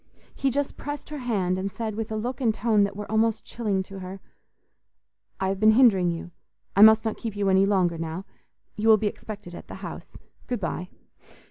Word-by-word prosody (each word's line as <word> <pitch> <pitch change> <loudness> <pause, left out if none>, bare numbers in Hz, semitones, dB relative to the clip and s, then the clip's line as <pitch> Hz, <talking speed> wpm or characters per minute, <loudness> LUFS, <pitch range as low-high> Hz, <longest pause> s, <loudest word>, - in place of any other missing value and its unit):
He 275 - 0
just 280 +2 -2
pressed 290 +1 -6
her 300 - -4
hand, 195 -7 0
and 195 +1 -2
said, 220 +2 -4
with 220 +1 -4
a - - -1
look 240 +4 -3
and 235 -3 +3
tone 215 -1 +2
that 200 - -6
were 210 0 -5
almost 220 0 +1
chilling 205 -5 -1
to 195 +1 -10
her, 190 +1 -7 1.2
"I 190 - 0
have 195 0 -2
been 215 +1 +6
hindering 215 -8 +5
you; 170 +1 -5 0.4
I 200 - +5
must 220 +1 +8
not 220 - -1
keep 225 -4 -5
you 200 -1 +1
any 190 +1 +4
longer 180 -4 +1
now. 165 +3 -4 0.5
You 215 +2 -1
will 220 -1 +8
be 215 - -3
expected 205 -3 -5
at - - -10
the - - -8
house. - - -8 0.4
Good 245 - -2
bye." 180 -1 -4
210 Hz, 210 wpm, -26 LUFS, 190-225 Hz, 1.2 s, must